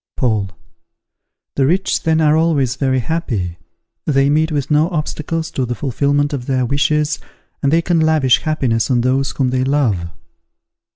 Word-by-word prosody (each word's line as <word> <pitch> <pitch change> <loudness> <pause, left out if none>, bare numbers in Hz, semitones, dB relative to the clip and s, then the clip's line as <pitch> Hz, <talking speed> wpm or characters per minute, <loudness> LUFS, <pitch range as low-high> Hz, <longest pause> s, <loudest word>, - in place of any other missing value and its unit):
Paul. 110 -6 0 1.0
The 135 -1 +1
rich 185 +5 +1
then 160 -1 +1
are 155 -1 +4
always 150 -6 +1
very 130 -1 0
happy! 110 - -3 0.5
They 140 -1 +2
meet 160 +2 +2
with 145 -1 -2
no 150 +3 +3
obstacles 165 0 -3
to 130 - -2
the 120 0 -3
fulfilment 145 +3 0
of 125 -3 -4
their 130 -2 +1
wishes, 150 +2 0 0.4
and 140 - +1
they 165 +1 +3
can 175 -1 +1
lavish 155 -5 +3
happiness 125 -8 0
on 125 -2 +2
those 130 +3 +1
whom 130 -2 -1
they 130 0 0
love. 125 -11 0
140 Hz, 160 wpm, -17 LUFS, 130-155 Hz, 1.0 s, are